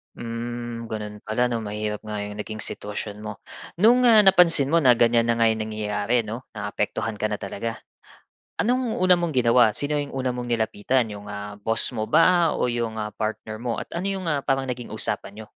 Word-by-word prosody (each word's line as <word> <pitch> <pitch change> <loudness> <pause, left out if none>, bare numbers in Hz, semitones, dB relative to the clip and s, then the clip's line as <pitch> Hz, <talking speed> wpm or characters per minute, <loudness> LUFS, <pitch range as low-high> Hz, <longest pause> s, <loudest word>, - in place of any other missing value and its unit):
Hmm, 120 0 -5
gano'n 105 -1 -6
pala 120 +3 +1
'no? 120 - -1
Mahirap 105 0 -4
nga 105 -1 -4
'yong 105 0 -6
naging 110 0 -5
sitwasyon 105 0 -4
mo. 105 -1 -7 0.4
No'ng, 245 +3 +6
ah, 220 -3 +8
napansin 175 -7 +5
mo 170 - +4
na 130 -6 +6
ganyan 115 0 +3
na 115 - +2
nga 115 -1 +3
'yong 110 -1 -1
nangyayari 105 +2 0
'no, 115 +4 -7
naapektuhan 105 +1 -3
ka 110 - -2
na 105 -1 -2
talaga, 110 +3 -5 0.8
anong 245 0 0
una 180 -1 +5
mong 170 -4 -2
ginawa? 120 -3 +4
Sino 145 +3 -1
'yong 145 -1 -4
una 130 -1 -1
mong 125 0 -4
nilapitan? 115 +1 0
'Yong, 105 0 -8
ah, 105 0 -7
boss 115 +4 -1
mo 110 -3 -3
ba 165 +5 +4
o 125 - 0
'yong, 115 -2 -2
ah, 105 - -4
partner 110 0 -4
mo? 120 -1 -3
At - - -14
ano 190 - -3
'yong 195 -1 -2
mga 150 -5 -1
parang 135 -1 0
naging 125 -1 -6
usapan 105 +3 -3
n'yo? - - -12
115 Hz, 200 wpm, -24 LUFS, 105-135 Hz, 0.8 s, ah